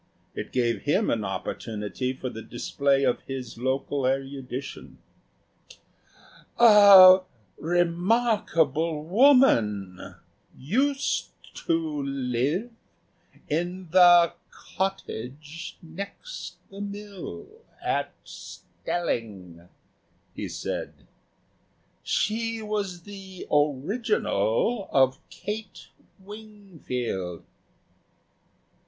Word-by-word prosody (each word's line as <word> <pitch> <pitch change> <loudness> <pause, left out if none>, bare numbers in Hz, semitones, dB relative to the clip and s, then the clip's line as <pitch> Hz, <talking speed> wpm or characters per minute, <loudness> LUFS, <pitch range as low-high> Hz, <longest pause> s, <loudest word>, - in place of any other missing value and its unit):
It - - -6
gave 120 -2 0
him 190 +9 +1
an 110 -2 -1
opportunity 105 +5 -4
for 130 0 -6
the 110 - -8
display 140 +4 0
of 125 -2 +1
his 130 -4 -6
local 130 +1 -1
erudition. 135 0 -4 1.6
"A 200 -5 +9 0.4
remarkable 170 - +1
woman 155 - +3 0.4
used 270 - 0 0.4
to 160 -3 0
live 140 - -1 0.8
in 175 +3 -3
the 175 -2 +7 0.2
cottage 155 -3 -6
next 200 - -8 0.2
the 200 +1 -8
mill 200 - -7 0.3
at - - -1
Stelling," 95 - -6 0.6
he - - -5
said; - - -4 1.1
"she 225 +2 -1
was 200 -5 -3
the 195 -2 -10
original 155 - 0
of 130 -1 +3
Kate 215 +1 -7 0.3
Wingfield." 190 - -6
165 Hz, 75 wpm, -26 LUFS, 130-200 Hz, 1.6 s, A